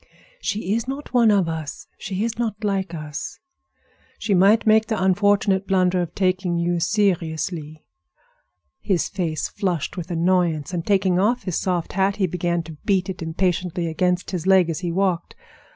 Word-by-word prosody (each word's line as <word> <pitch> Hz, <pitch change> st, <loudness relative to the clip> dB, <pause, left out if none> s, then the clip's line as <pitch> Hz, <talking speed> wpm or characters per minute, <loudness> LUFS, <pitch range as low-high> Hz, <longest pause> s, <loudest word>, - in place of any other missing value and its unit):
"She 205 Hz, -, -2 dB
is 230 Hz, +2 st, -1 dB
not 275 Hz, +1 st, -6 dB
one 235 Hz, -3 st, +5 dB
of 200 Hz, -4 st, +3 dB
us; 160 Hz, -2 st, -5 dB
she 195 Hz, +1 st, -3 dB
is 230 Hz, 0 st, -3 dB
not 220 Hz, -2 st, -2 dB
like 195 Hz, -4 st, -1 dB
us. 150 Hz, -2 st, -6 dB, 0.8 s
She 210 Hz, -, -1 dB
might 195 Hz, +4 st, +5 dB
make 220 Hz, 0 st, +4 dB
the 220 Hz, -3 st, -1 dB
unfortunate 195 Hz, +1 st, +2 dB
blunder 185 Hz, -1 st, +2 dB
of 170 Hz, -2 st, -5 dB
taking 185 Hz, -2 st, 0 dB
you 170 Hz, 0 st, 0 dB
seriously." 165 Hz, -5 st, -1 dB, 0.9 s
His 185 Hz, -4 st, 0 dB
face 165 Hz, -5 st, -2 dB
flushed 180 Hz, -3 st, -2 dB
with 175 Hz, 0 st, -5 dB
annoyance, 170 Hz, -2 st, +1 dB
and 170 Hz, -2 st, -2 dB
taking 190 Hz, -2 st, +2 dB
off 235 Hz, +6 st, +1 dB
his 185 Hz, -4 st, -1 dB
soft 175 Hz, -3 st, -2 dB
hat 195 Hz, +1 st, +1 dB
he 195 Hz, -, +1 dB
began 175 Hz, -1 st, -1 dB
to 160 Hz, -1 st, -10 dB
beat 190 Hz, -1 st, +1 dB
it 180 Hz, -, -10 dB
impatiently 175 Hz, +1 st, -1 dB
against 180 Hz, +2 st, 0 dB
his 180 Hz, -1 st, -3 dB
leg 185 Hz, -3 st, +5 dB
as 160 Hz, -, -4 dB
he 175 Hz, -2 st, -3 dB
walked. 180 Hz, -1 st, -1 dB
185 Hz, 170 wpm, -22 LUFS, 170-200 Hz, 0.9 s, one